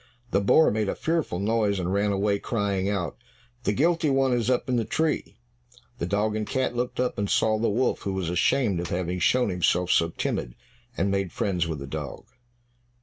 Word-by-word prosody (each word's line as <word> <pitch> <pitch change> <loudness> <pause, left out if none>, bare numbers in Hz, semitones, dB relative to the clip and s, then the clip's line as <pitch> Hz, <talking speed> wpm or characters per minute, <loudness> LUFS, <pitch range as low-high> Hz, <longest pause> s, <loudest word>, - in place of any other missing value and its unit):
The 100 - +2
boar 155 +10 +5
made 105 -1 0
a - - -2
fearful 160 - -1
noise 105 0 +1
and 90 +1 -1
ran 100 +1 +1
away, 100 +1 +1
crying 100 -4 -1
out, 90 -7 -2 0.5
"The - - +3
guilty 160 +6 +2
one 135 -1 +2
is 120 0 0
up 125 - +1
in 130 - +1
the 115 - +1
tree." 160 +7 -1 0.6
The 85 - -2
dog 105 +3 0
and 110 -1 -2
cat 130 -2 -1
looked 125 +1 -2
up 125 -3 0
and 100 -1 -1
saw 110 -1 +2
the 115 - +1
wolf, 120 +5 +1
who 100 - -3
was 95 -3 -2
ashamed 100 +2 +2
of 85 -1 -4
having 90 0 -2
shown 125 +4 +3
himself 90 0 +1
so 85 - +3
timid, - - -3 0.4
and 100 0 +1
made 100 -3 -1
friends 90 -4 -1
with 80 -2 -3
the 70 - -7
dog. 70 -1 -6
100 Hz, 205 wpm, -26 LUFS, 90-120 Hz, 0.6 s, boar